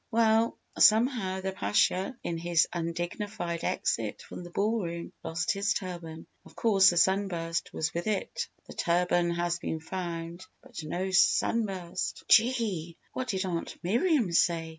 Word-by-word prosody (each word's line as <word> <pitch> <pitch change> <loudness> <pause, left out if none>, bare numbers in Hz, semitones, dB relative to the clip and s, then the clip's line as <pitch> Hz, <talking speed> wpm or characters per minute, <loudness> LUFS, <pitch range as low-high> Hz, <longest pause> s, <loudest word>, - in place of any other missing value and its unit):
"Well, 225 0 +3 0.2
somehow, 215 -4 +4
the 190 0 -2
Pasha 195 +3 +1
in 165 -1 -3
his 170 0 +2
undignified 175 +1 -3
exit 110 -2 -1
from - - -9
the 175 - -9
ball 215 +5 0
room 170 0 -5
lost 165 +2 -1
his 200 +2 0
turban. 170 -4 -6 0.2
Of - - -17
course 200 -4 +5
the 175 - -1
sunburst 175 -3 +1
was 160 +1 -2
with 170 +3 -3
it. 470 - -2 0.2
The - - -11
turban 175 0 +1
has 175 0 -1
been 160 - -3
found 170 0 -5 0.2
but 245 -6 -8
no 180 +5 -3
sunburst!" 190 -1 +1
"Gee! 220 -8 +2 0.2
What 255 - -3
did 190 -3 -1
Aunt 170 -3 -3
Miriam 235 - +2
say?" 165 -1 +2
185 Hz, 145 wpm, -29 LUFS, 170-215 Hz, 0.2 s, course